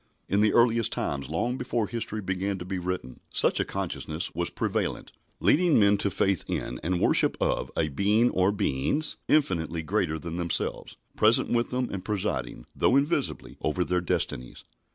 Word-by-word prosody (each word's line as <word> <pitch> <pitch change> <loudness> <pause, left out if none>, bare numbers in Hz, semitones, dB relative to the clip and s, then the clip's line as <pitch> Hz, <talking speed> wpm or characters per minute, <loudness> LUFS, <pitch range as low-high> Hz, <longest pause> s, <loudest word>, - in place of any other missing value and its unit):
In 100 +2 +2
the 105 - +4
earliest 115 -2 +3
times, 70 0 -2
long 120 +11 -1
before 120 -3 -1
history 110 -1 -4
began 95 +1 -2
to 90 - -7
be 95 0 -3
written, 90 -8 -4
such - - +2
a - - +3
consciousness 80 +3 -3
was - - -1
prevalent, - - -2 0.3
leading 170 -2 +4
men 100 -1 +5
to 100 - 0
faith 95 -1 +1
in 60 - -3
and 90 +3 -1
worship - - +3
of - - 0
a 80 - +2
Being 105 - +2
or 95 +1 +2
Beings 105 - 0
infinitely 85 - +1
greater 90 -3 0
than 85 +2 -6
themselves, 85 -2 -2 0.2
present 110 +2 +4
with 120 0 +1
them 125 0 -1
and 95 -2 -5
presiding, 90 - -3
though 125 - +3
invisibly, 140 0 0
over 80 +4 0
their 90 0 0
destinies. 60 -7 -3
95 Hz, 170 wpm, -27 LUFS, 85-115 Hz, 0.3 s, men